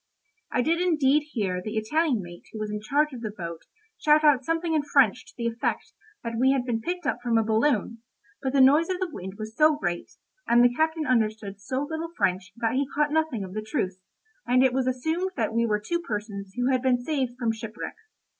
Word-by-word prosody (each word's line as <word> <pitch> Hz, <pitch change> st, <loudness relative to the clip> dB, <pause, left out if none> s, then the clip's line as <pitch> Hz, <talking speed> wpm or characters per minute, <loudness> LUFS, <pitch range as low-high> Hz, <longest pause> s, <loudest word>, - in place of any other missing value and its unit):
I 245 Hz, -, +1 dB
did 335 Hz, +4 st, +1 dB
indeed 300 Hz, -4 st, +3 dB
hear 190 Hz, -6 st, -1 dB
the 215 Hz, +3 st, -4 dB
Italian 250 Hz, -, +1 dB
mate 175 Hz, 0 st, -11 dB
who -, -, -8 dB
was 215 Hz, -1 st, -3 dB
in 210 Hz, 0 st, -4 dB
charge 290 Hz, +7 st, +1 dB
of 245 Hz, -, -7 dB
the 220 Hz, -, -3 dB
boat 170 Hz, -5 st, -7 dB, 0.4 s
shout 300 Hz, 0 st, +4 dB
out 290 Hz, -3 st, +5 dB
something 330 Hz, +3 st, -1 dB
in 310 Hz, -, +3 dB
French 275 Hz, -3 st, +2 dB
to -, -, -15 dB
the 235 Hz, -, -3 dB
effect 230 Hz, 0 st, -2 dB, 0.3 s
that 230 Hz, -1 st, -3 dB
we 265 Hz, +2 st, +4 dB
had 260 Hz, -2 st, 0 dB
been 230 Hz, -3 st, -1 dB
picked 355 Hz, +4 st, -4 dB
up 245 Hz, -, 0 dB
from 240 Hz, -2 st, +1 dB
a 225 Hz, -, +3 dB
balloon, 225 Hz, 0 st, +1 dB, 0.4 s
but 265 Hz, -, -1 dB
the 275 Hz, 0 st, +4 dB
noise 295 Hz, +6 st, +5 dB
of 365 Hz, -1 st, -1 dB
the 370 Hz, -3 st, -2 dB
wind 190 Hz, -8 st, -7 dB
was 215 Hz, 0 st, -7 dB
so 305 Hz, +3 st, +5 dB
great, 175 Hz, -9 st, -3 dB, 0.4 s
and 240 Hz, +1 st, +5 dB
the 245 Hz, 0 st, +5 dB
captain 315 Hz, +3 st, 0 dB
understood 215 Hz, -5 st, 0 dB
so 260 Hz, +6 st, -2 dB
little 320 Hz, +1 st, -4 dB
French 185 Hz, -, 0 dB
that 230 Hz, -1 st, -1 dB
he 270 Hz, +1 st, +1 dB
caught 295 Hz, 0 st, +2 dB
nothing 315 Hz, -9 st, 0 dB
of 185 Hz, -1 st, -8 dB
the 215 Hz, -, -3 dB
truth, 205 Hz, -5 st, -3 dB, 0.5 s
and 250 Hz, +1 st, +4 dB
it 260 Hz, -2 st, +3 dB
was 260 Hz, 0 st, 0 dB
assumed 320 Hz, +9 st, -1 dB
that 225 Hz, -3 st, -1 dB
we 230 Hz, 0 st, +2 dB
were 210 Hz, -1 st, +1 dB
two 340 Hz, +12 st, -2 dB
persons 205 Hz, -, -5 dB
who 250 Hz, +2 st, +2 dB
had 255 Hz, -1 st, +2 dB
been 255 Hz, -1 st, +3 dB
saved 260 Hz, -4 st, -1 dB
from 235 Hz, -3 st, 0 dB
shipwreck. 225 Hz, 0 st, -6 dB
245 Hz, 225 wpm, -26 LUFS, 215-295 Hz, 0.5 s, out